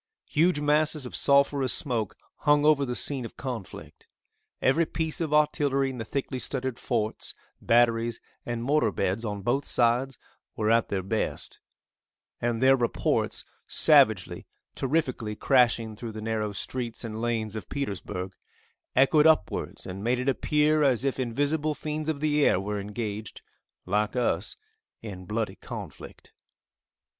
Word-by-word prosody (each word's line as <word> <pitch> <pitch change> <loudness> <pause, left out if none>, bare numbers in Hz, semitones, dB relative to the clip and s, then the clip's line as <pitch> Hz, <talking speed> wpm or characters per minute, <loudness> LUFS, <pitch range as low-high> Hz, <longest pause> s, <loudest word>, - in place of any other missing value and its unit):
Huge 165 +1 +2
masses 150 0 +1
of 125 - -7
sulphurous 140 -1 +3
smoke 110 -5 -1 0.2
hung 145 -1 +3
over 150 -2 +4
the 125 -1 -3
scene 135 -1 0
of 115 - -9
conflict. 125 -7 -7 0.5
Every 160 +5 +2
piece 160 +1 -3
of 160 -3 -1
artillery 145 -3 +2
in 125 - -8
the 115 - -4
thickly 130 +2 -3
studded 130 -2 -3
forts, 110 -3 -2 0.3
batteries 115 -1 +2 0.2
and 120 -1 -4
mortar 135 -4 +2
beds 100 +4 -1
on 105 -3 -4
both 130 +6 +1
sides 125 +2 +1 0.4
were 110 +1 +1
at 115 0 +3
their 95 -2 -2
best, 110 +4 -3 0.8
and 120 0 0
their 135 +1 +7
reports 120 -3 0 0.2
savagely, - - +4 0.3
terrifically 130 -7 -1
crashing 115 -3 +2
through 115 +1 -7
the 110 - -6
narrow 110 -1 -2
streets 120 +3 -4
and 110 -1 -5
lanes 115 -2 -1
of 110 - -7
Petersburg, 95 -7 -4 0.6
echoed 150 +4 +5
upwards, 160 -1 +1
and 95 +2 -6
made 120 +2 +1
it 125 +2 -3
appear 150 +3 +2
as 135 -3 +2
if 135 -1 -1
invisible 145 +5 0
fiends 155 +1 -4
of 150 -3 -2
the 150 -1 +2
air 90 - +4
were 105 +1 -3
engaged, 105 +1 -5 0.4
like 105 +4 0
us, 115 -6 0 0.5
in 95 -4 -7
bloody 110 +3 -3
conflict. - - -9
125 Hz, 145 wpm, -27 LUFS, 110-145 Hz, 0.8 s, their